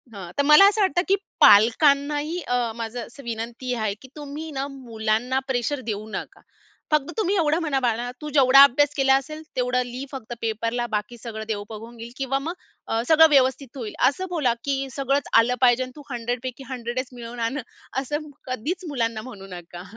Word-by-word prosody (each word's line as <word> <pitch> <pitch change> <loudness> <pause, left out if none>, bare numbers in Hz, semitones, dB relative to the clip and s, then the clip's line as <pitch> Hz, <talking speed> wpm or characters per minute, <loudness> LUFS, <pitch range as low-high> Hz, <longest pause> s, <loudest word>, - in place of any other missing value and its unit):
हं. 180 -3 -8
तर 285 - +3
मला 300 +6 +8
असं 420 +1 -1
वाटतं 375 -2 +2
की 390 - +4 0.3
पालकांनाही 285 - +5
अ, 245 -4 -1
माझं 230 +1 -5
असं 275 +3 -13
विनंती 235 +2 -4
आहे, 215 -3 -1
की 265 - -12
तुम्ही 295 +2 -7
ना 275 +1 -1
मुलांना 240 -1 -1
प्रेशर 260 +2 -1
देऊ 215 0 -3
नका. - - -7 0.5
फक्त 300 +1 +1
तुम्ही 405 -2 +1
एवढं 320 0 +2
म्हणा, 295 -5 0
"बाळा 240 0 0
तू 300 - -5
जेवढा 275 -1 +7
अभ्यास 290 +2 +4
केला 270 0 +4
असेल, 305 +3 -9 0.2
तेवढं 250 0 +1
लिही 250 +3 -6
फक्त 250 -4 -7
पेपरला. 230 +2 -1
बाकी 210 +2 -3
सगळं 220 -2 -7
देव 205 -2 -2
बघून 225 +2 -9
घेईल 230 +1 -9
किंवा 270 0 -1
मग 320 +5 -4 0.3
अ, 225 - 0
सगळं 320 0 +7
व्यवस्थित 265 -1 +2
होईल." 225 -5 -5 0.2
असं 370 +7 -5
बोला. 275 -9 +1
की 275 -1 -1
"सगळंच 275 +1 0
आलं 245 +2 +2
पाहिजे 250 0 +5
आणि 255 - -8
तू 290 - -10
100 245 +1 -2
पैकी 255 +1 -6
100च 250 0 -3
मिळवून 240 0 -8
आण" 235 +6 -1 0.4
असं 295 +3 -4 0.2
कधीच 310 - -3
मुलांना 230 -5 -1
म्हणू 205 -7 -10
नका. 175 0 -10
255 Hz, 185 wpm, -24 LUFS, 230-285 Hz, 0.5 s, मला